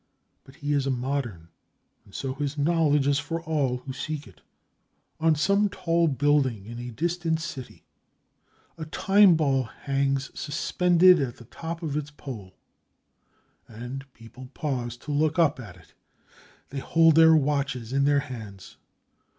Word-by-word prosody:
But 135 - -17
he 145 0 -2
is 140 -1 +1
a - - +1
modern, 125 -9 -3 0.6
and 100 - -17
so 135 -1 -3
his 145 +1 -4
knowledge 150 -2 +2
is 140 0 +2
for 165 +3 -4
all 145 -6 0
who 130 +1 -8
seek 150 +2 -5
it. 85 -5 -18 0.8
On 160 0 +3
some 200 +7 +2
tall 170 -2 +1
building 135 -7 +1
in 115 +2 -8
a 120 0 -6
distant 165 +6 -1
city, 140 -5 -8 0.9
a 160 - -4
time 195 +3 +4
ball 140 -4 +2
hangs 135 +2 -2
suspended 175 +3 +3
at 125 -3 -3
the 120 - -14
top 165 +7 -7
of 150 -3 -3
its 150 -1 -3
pole, 115 -10 -9 1.1
and 125 +4 -8
people 115 +3 -13
pause 125 -6 -3
to 145 - -8
look 155 +2 +1
up 160 -6 +3
at 115 - -10
it. - - -21 0.8
They 140 - -5
hold 165 +3 +4
their 160 +1 +7
watches 140 -5 -1
in 140 0 +2
their 145 0 +3
hands. 110 -8 -10
140 Hz, 150 wpm, -26 LUFS, 130-160 Hz, 1.1 s, their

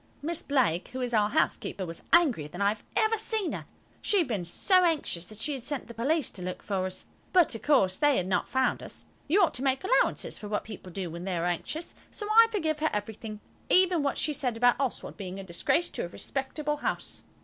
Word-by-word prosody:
Miss 335 +2 -1
Blake, 245 - +1
who 260 - -3
is 245 -1 -2
our 210 -2 +3
housekeeper, 195 -2 0
was 165 -1 -5
angrier 280 - +4
than 175 +5 -10
I 200 0 +4
have 210 +1 -4
ever 440 0 +3
seen 435 -4 0
her. - - -6 0.3
She 415 - +2
had 340 -6 +3
been 205 -8 -2
so 365 - +4
anxious 290 - 0
that 215 - -9
she 290 +7 -1
had 265 - -5
sent 275 +2 -3
the 235 - -9
police 275 +5 0
to 185 - -7
look 180 0 -5
for 190 -2 -1
us. 185 - -7 0.3
But, 355 -7 +5
of 225 - -5
course, 195 -11 +3
they 290 -2 +4
had 180 - 0
not 190 +2 0
found 260 0 +1
us. - - -5 0.2
You 375 +7 +4
ought 345 - +3
to 250 - -1
make 265 -1 +1
allowances 400 +6 +1
for 210 - -7
what 210 0 -1
people 195 -4 -9
do 180 -2 -4
when 170 +2 -6
they 185 -2 -1
are 170 - -1
anxious, 180 - -2 0.2
so 415 - -4
I 455 +1 +8
forgive 315 -8 -1
her 315 +1 +2
everything, 210 +1 -5 0.3
even 365 -3 +5
what 280 -1 0
she 305 - 0
said 250 -4 -1
about 245 +1 +4
Oswald 270 -3 -3
being 190 -1 -6
a - - -6
disgrace 190 - 0
to - - -3
a - - -5
respectable 280 - -3
house. - - -3
250 Hz, 235 wpm, -28 LUFS, 195-315 Hz, 0.3 s, I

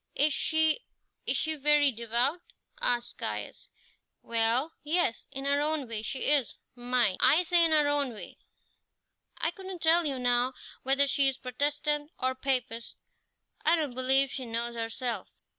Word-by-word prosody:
"Is 295 +1 +3
she 315 +4 +2 0.5
is - - +1
she 315 - 0
very 295 -1 +4
devout?" 240 +8 -1 0.4
asked 240 0 0
Caius. - - -5 0.5
"Well, 230 +6 +1
yes, 305 -6 0
in 270 0 -6
her 285 +1 +2
own 300 -3 -1
way 225 -2 -4
she 255 +4 -4
is 280 -6 +1 0.2
mind, 245 -5 0
I 320 +5 +5
say 345 0 +3
in 330 - +4
her 305 -2 +3
own 290 -3 +1
way. 215 - -11 1.0
I 330 - 0
couldn't 375 -1 -9
tell 330 0 +4
you, 275 -2 -2
now, 245 +1 +1 0.3
whether 275 +2 +3
she 280 0 +2
is 270 -1 -1
Protestant 290 +3 -2
or 260 0 0
Papist; 250 -3 -3 0.7
I 330 - +4
don't 300 -6 -2
believe 265 +2 +2
she 265 - -5
knows 235 +1 -3
herself." 230 -2 -4
270 Hz, 155 wpm, -29 LUFS, 245-300 Hz, 1.0 s, I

